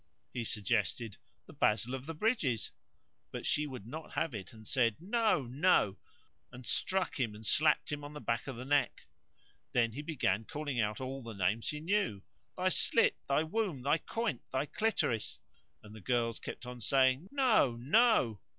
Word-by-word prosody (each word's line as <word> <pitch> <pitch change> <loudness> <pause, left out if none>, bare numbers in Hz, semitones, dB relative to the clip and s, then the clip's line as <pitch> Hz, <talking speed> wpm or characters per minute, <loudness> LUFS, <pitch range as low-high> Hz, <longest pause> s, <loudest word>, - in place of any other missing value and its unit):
He 120 - -2
suggested, 110 0 -1 0.3
"The - - -13
basil 115 +4 +1
of 135 +1 -5
the 165 - -5
bridges;" 155 - 0 0.6
but - - -6
she 150 0 +1
would 130 -7 -8
not 155 +7 -8
have 160 -4 -1
it 95 -4 -7
and 110 -1 -14
she - - -5
said, 115 -5 +3
"No! 215 - +1
no!" 125 - +2 0.5
and 125 0 -11
struck 185 +1 0
him 115 -5 -1
and 110 +1 -11
slapped 155 +8 +3
him 145 0 -4
on 145 +1 -8
the 150 - -7
back 115 -1 -2
of 135 - -4
the 125 +2 -7
neck. 140 -2 +1 0.7
Then 115 -2 +3
he 135 +6 -5
began 115 - -1
calling 145 -2 -4
out 105 +1 0
all 135 +1 -4
the 115 -3 -8
names 100 +4 0
he 150 - -3
knew, 165 - 0 0.3
"Thy 185 0 +2
slit, 230 +4 +5
thy 140 +3 +3
womb, 165 - -2
thy 145 +4 +2
coynte, 230 +4 -2
thy 130 +2 0
clitoris;" 145 - -1 0.5
and 105 0 -12
the 110 - -11
girls 115 0 0
kept - - -7
on 125 -1 -8
saying, 130 - +3
"No! 245 - +3
no!" 135 - +3
130 Hz, 180 wpm, -33 LUFS, 115-160 Hz, 0.7 s, slit